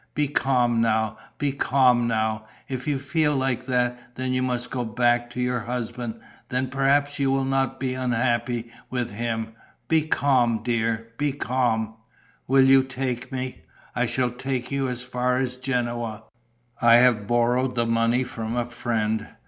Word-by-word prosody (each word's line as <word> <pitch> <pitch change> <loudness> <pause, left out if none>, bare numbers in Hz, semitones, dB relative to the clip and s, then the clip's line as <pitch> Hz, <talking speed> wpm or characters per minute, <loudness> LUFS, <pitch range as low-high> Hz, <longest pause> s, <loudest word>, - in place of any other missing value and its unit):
Be 150 -1 +2
calm 125 -4 +2
now, 110 -1 +1 0.2
be 145 -2 0
calm 125 -3 +3
now. 110 -1 -1 0.2
If 130 0 -5
you 145 -2 +1
feel 150 +2 +1
like 130 -1 -1
that, 125 -1 -1
that 130 0 -3
you 130 0 +1
must 125 -1 -2
go 125 -2 -1
back 120 +1 +1
to 120 - -7
your 125 0 0
husband, 120 0 -4 0.3
then 130 +1 -1
perhaps 140 +2 +2
you 135 -1 +2
will 135 0 +2
not 135 0 0
be 130 -1 -1
unhappy 120 -2 -1 0.2
with 125 -3 -2
him. 115 +1 -3 0.4
Be 160 -1 +3
calm, 125 -7 +2
dear, 115 -1 -1
be 145 -1 +1
calm." 115 -5 -1 0.5
"Will 135 0 +5
you 135 0 +7
take 130 -1 -4
me?" 130 -1 -4 0.3
"I 125 -1 +1
shall 120 +1 0
take 125 0 -3
you 135 -1 0
as 125 -1 -4
far 125 0 0
as 125 -1 -1
Genoa. 120 -4 -2 0.6
I 115 0 +7
have 120 -4 +4
borrowed 120 +2 +2
the 120 -1 +2
money 115 +2 +2
from 115 -2 -4
a 120 - +1
friend. 110 -2 -2
125 Hz, 165 wpm, -24 LUFS, 115-130 Hz, 0.6 s, you